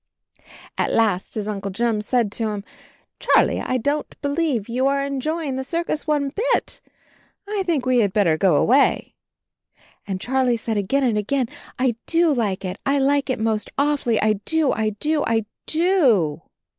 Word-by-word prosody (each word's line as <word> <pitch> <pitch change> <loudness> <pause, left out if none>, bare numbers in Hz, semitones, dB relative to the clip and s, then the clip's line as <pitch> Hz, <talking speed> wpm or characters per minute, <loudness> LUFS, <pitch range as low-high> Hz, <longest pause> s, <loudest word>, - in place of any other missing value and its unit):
At - - +1
last 205 -5 +1
his 210 -2 -3
Uncle 200 -2 -3
Jim 220 +2 0
said 230 -1 0
to 220 0 -2
him, 205 -1 -4 0.6
"Charlie, - - +3
I 255 - -1
don't 285 +5 -2
believe 285 -7 0
you 255 +3 0
are 275 0 +1
enjoying 280 +1 -2
the 265 - -2
circus 330 +2 -3
one 290 -2 +1
bit 470 - -1 0.3
— - - -37
I 415 -1 -1
think 300 -7 0
we 255 -1 +3
had 205 -4 +2
better 185 -6 +3
go 175 0 +3
away." 265 - +3 0.9
And 190 -2 -3
Charlie 250 +1 +1
said 225 0 -3
again 210 +8 0
and 230 -5 +2
again, 250 +3 -1 0.3
"I 255 -3 +1
do 335 -2 +3
like 205 -7 -1
it; 185 +2 -5
I 280 +1 +1
like 280 0 +1
it 260 - 0
most 220 -1 -1
awfully. 280 -5 +1
I 215 -2 +1
do, 320 -4 +1
I 220 -1 0
do, 305 +4 0
I 225 -1 +1 0.2
DO." 265 - +2
255 Hz, 170 wpm, -22 LUFS, 215-285 Hz, 0.9 s, Charlie